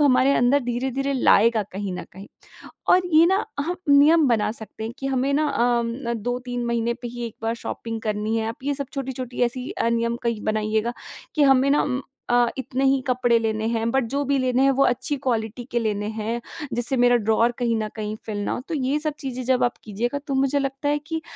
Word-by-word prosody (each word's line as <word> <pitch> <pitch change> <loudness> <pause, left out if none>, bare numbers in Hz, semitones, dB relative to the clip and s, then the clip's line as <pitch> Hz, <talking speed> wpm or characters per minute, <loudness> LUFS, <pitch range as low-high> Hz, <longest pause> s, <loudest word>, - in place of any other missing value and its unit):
हमारे 270 -1 +4
अंदर 250 +4 +3
धीरे-धीरे 265 +3 -2
लाएगा 230 -3 +4
कहीं 195 -1 -4
न 180 - -5
कहीं। 195 +3 -11 0.7
और 365 - +6
ये 320 +2 +8
ना 385 +3 +2 0.2
हम 350 +5 -2
नियम 295 +2 +6
बना 225 -3 +2
सकते 220 -1 -8
हैं 225 - -4
कि 270 - -4
हमें 270 +1 0
ना 305 +1 +2
अम, 240 -1 +1 0.2
ना 235 0 -1
2-3 245 +2 -3
महीने 235 0 0
पे 240 - -4
ही 240 0 -6
एक 225 - -9
बार 225 +1 0
शॉपिंग 230 -1 -5
करनी 215 +1 -1
है, 220 0 -1
आप 230 - -5
ये 285 0 0
सब 280 -1 -4
छोटी-छोटी 260 -3 -5
ऐसी 250 +2 -3
अ, 230 - -1
नियम 235 0 0
कहीं 230 -3 -1
बनाइएगा, 215 +2 0 0.4
कि 300 - +2
हमें 270 0 +5
ना 290 - +4
उम 260 -2 -1 0.3
अ, 245 0 +4
इतने 265 +1 -2
ही 270 0 +3
कपड़े 245 -2 +3
लेने 220 -1 -1
हैं, 230 0 0
बट 265 -1 +1
जो 285 - +1
भी 275 0 +1
लेने 255 0 +2
हैं 275 - +5
वो 275 +1 +3
अच्छी 255 +4 0
क्वालिटी 230 0 -1
के 240 - +1
लेने 210 -2 -1
हैं, 225 +2 -2 0.3
जिससे 240 +3 0
मेरा 245 0 +5
ड्रॉवर 225 +2 +2
कहीं 235 -2 +1
न 215 - -3
कहीं 215 0 -3
फिल 210 -2 -3
ना - - -1
हो। - - -2
तो 330 - -2
ये 275 +1 0
सब 305 -1 0
चीज़ें 255 -2 -4
जब 255 0 +2
आप 245 - 0
कीजिएगा, 235 +6 -2
तो 275 - -2
मुझे 275 +1 +2
लगता 275 +1 -2
है 295 0 +2
कि 320 -1 -3
245 Hz, 225 wpm, -23 LUFS, 230-270 Hz, 0.7 s, ये